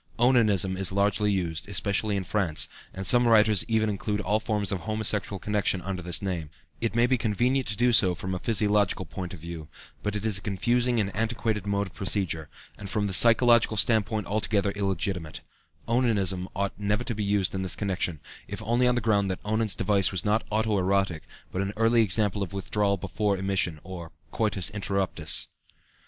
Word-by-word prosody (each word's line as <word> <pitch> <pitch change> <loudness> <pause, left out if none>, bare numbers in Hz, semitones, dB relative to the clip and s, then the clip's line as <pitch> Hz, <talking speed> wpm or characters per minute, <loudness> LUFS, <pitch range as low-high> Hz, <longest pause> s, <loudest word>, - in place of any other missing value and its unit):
"Onanism" 110 -7 +3
is 95 0 +1
largely 100 +1 +1
used, 85 -2 -2
especially 100 +2 0
in 95 - -2
France, 90 -5 -1 0.2
and 95 +1 -6
some 120 +2 +4
writers 110 -3 +5
even 110 -1 +1
include 105 0 -2
all 105 +2 +1
forms 105 -3 -1
of 100 - -1
homosexual 105 -1 -2
connection 100 -1 0
under 95 -1 -4
this 85 -2 -1
name; 85 -6 -3 0.3
it 115 -1 -2
may 120 0 +4
be 125 0 +1
convenient 120 +4 0
to 110 - -1
do 120 0 +3
so 95 -5 +5
from 95 +1 -5
a 90 - -3
physiological 105 -3 +1
point 90 +3 -6
of 95 - -9
view, 85 -1 -8 0.3
but 105 0 -2
it 105 +1 -3
is 105 -3 +2
a - - -16
confusing 120 +5 0
and 100 -3 -2
antiquated 110 -2 -1
mode 100 0 0
of 95 - -12
procedure, 90 -6 -1 0.3
and 100 -2 -7
from 105 +1 -1
the 100 - -2
psychological 115 +1 +5
standpoint 110 -1 +2
altogether 105 -1 0
illegitimate; 95 -4 -3 0.5
"onanism" 100 -7 +1
ought 100 +1 -1
never 105 +3 0
to 120 - -3
be 105 -1 -3
used 100 -2 0
in 95 - -2
this 95 -2 -1
connection, 90 -5 -2 0.3
if - - -6
only 120 +3 +2
on 125 - +2
the 120 - 0
ground 100 -3 +1
that 95 - -3
Onan's 110 -1 0
device 100 -1 +1
was 95 -3 -3
not 105 +2 +2
auto 110 -1 +1
erotic, 95 -3 0 0.2
but 95 - -4
was 100 - 0
an 100 - -5
early 115 +1 +4
example 105 -1 +1
of 100 -1 -4
withdrawal 100 +2 0
before 100 +2 -1
emission, 95 -4 -1
or 85 -2 -8 0.2
coitus 105 -5 0
interruptus. 100 -5 -2
100 Hz, 190 wpm, -27 LUFS, 95-110 Hz, 0.5 s, writers